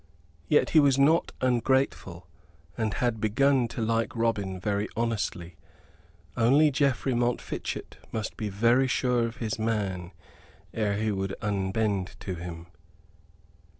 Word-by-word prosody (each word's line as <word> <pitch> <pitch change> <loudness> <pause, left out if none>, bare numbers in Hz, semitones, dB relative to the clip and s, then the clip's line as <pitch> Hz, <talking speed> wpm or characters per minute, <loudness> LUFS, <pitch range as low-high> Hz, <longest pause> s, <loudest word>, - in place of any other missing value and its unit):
Yet 150 - +3
he 160 - +6
was 140 -2 +4
not 155 +5 +3
ungrateful; 120 -8 0 0.5
and 110 0 -1
had 120 -3 -1
begun 130 +4 +3
to 115 0 -4
like 115 0 0
Robin 105 -5 -1
very 100 +2 -1
honestly, 105 -7 -2 0.8
only 140 +6 +4
Geoffrey 135 -1 +1
Montfichet 120 0 -3
must 110 -1 -4
be 105 - -3
very 115 +6 +3
sure 125 -2 +1
of 115 +1 -9
his 110 -2 -3
man 100 -6 -2 0.6
ere 105 -2 0
he 110 +1 0
would 95 -1 -2
unbend 100 -1 -1
to 95 - -4
him. 85 -1 -7
110 Hz, 125 wpm, -27 LUFS, 100-125 Hz, 0.8 s, he